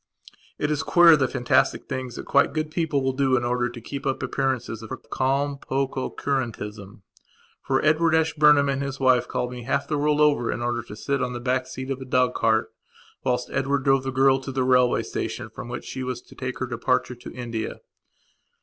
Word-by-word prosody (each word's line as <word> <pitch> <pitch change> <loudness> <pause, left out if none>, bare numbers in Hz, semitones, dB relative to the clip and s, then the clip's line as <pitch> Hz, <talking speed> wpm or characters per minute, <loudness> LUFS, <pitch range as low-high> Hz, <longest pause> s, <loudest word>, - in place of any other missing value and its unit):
It 150 - -1
is 150 -1 0
queer 170 0 +7
the 140 -3 +1
fantastic 125 -2 +1
things 130 -3 -4
that - - -7
quite 140 - +3
good 155 -1 -2
people 155 -4 0
will 130 0 0
do 130 -1 +2
in 120 - -1
order 120 0 0
to 120 0 -9
keep 140 +5 -6
up 135 - 0
their - - -2
appearance 135 -3 -1
of 115 -1 -6 0.3
calm 140 +2 0
pococurantism. 125 -7 -3 0.6
For 135 +2 0
Edward 160 +1 +3
Ashburnham 150 -3 +4
and 135 0 -1
his 135 -1 -4
wife 130 -2 +3
called 125 - -2
me 125 -1 -7
half 125 +3 -1
the 150 - -1
world 150 0 +2
over 145 -6 +3
in 120 - -3
order 120 0 -1
to 110 -3 -10
sit 140 +5 -2
on 125 -1 -1
the 120 - -4
back 130 +1 -1
seat 130 +1 -6
of 135 0 -4
a - - -6
dog 125 -1 +2
cart 110 0 +1 0.5
whilst 125 -1 -1
Edward 140 0 0
drove 135 -1 +3
the 135 - -4
girl 135 +1 +4
to 135 0 -6
the 130 0 0
railway 125 -1 +3
station - - -4
from - - -8
which 120 - -6
she 130 - -6
was 125 -1 -3
to - - -16
take 130 -1 -5
her 130 - -2
departure 125 0 0
to 120 - -10
India. 115 -3 -5
130 Hz, 210 wpm, -24 LUFS, 125-140 Hz, 0.6 s, queer